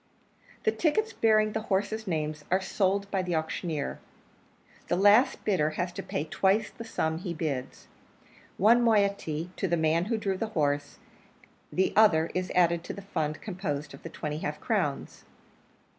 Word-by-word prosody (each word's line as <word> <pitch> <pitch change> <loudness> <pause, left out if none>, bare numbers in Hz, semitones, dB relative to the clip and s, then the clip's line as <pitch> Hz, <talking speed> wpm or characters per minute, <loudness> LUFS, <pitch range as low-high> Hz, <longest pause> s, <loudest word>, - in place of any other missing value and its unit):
The 440 - +3
tickets 435 +6 0
bearing 215 -1 +3
the 220 - -2
horses' 215 +2 -1
names 155 -3 -2
are 185 - +3
sold 195 +1 0
by 195 - +1
the 180 -2 -2
auctioneer; 160 -1 -3 0.9
the - - +1
last 205 +7 +4
bidder 180 -7 +2
has 180 0 -1
to - - -5
pay 145 - -3
twice 195 +6 +1
the 230 - -9
sum 160 -8 -2
he 175 -1 -5
bids 140 -5 -4 0.7
one 230 +5 +5
moiety 200 -7 +1
to 195 - -1
the 170 0 +1
man 160 +2 +2
who 225 +2 -1
drew 195 -3 -1
the 225 - -1
horse, 145 -1 0 0.7
the 190 - +1
other 170 -7 +5
is 185 0 -2
added 170 -1 +3
to - - -5
the 200 - -9
fund 155 -6 -3
composed 175 -8 -4
of - - -12
the 165 - -7
twenty 150 -1 -4
half 150 -1 -4
crowns. - - -2
185 Hz, 165 wpm, -28 LUFS, 160-210 Hz, 0.9 s, one